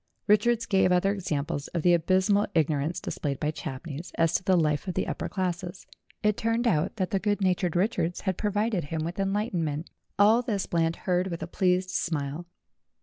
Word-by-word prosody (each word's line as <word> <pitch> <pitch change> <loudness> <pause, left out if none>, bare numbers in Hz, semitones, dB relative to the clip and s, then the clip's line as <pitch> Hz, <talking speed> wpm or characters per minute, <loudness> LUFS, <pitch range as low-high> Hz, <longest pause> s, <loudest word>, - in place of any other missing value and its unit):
Richards 230 +3 +3
gave 190 -2 +3
other 180 +2 +3
examples 150 -7 -3
of 165 - 0
the 175 - +5
abysmal 185 +4 +3
ignorance 155 0 +1
dis - - -6
played 140 -3 -2
by 150 0 0
Champneys 150 +3 -7
as 165 0 +3
to - - 0
the 185 -1 +3
life 150 +1 +1
of 180 - -3
the - - 0
upper - - -4
classes. 180 -1 -3 0.4
It 210 -1 +2
turned 230 +2 0
out 155 -9 +1
that 185 -4 -2
the 195 - +1
good 205 +1 0
natured 180 -3 +1
Richards 180 -3 0
had 190 - -1
provided 205 -2 0
him 155 +1 -3
with 175 +3 -5
enlightenment. 185 -6 -1 0.3
All 215 +4 +5
this 215 -6 -2
Bland 165 -1 0
heard 180 -1 +1
with 170 -3 -4
a - - -5
pleased 185 +1 +1
smile. 155 -1 -2
180 Hz, 190 wpm, -27 LUFS, 165-200 Hz, 0.4 s, the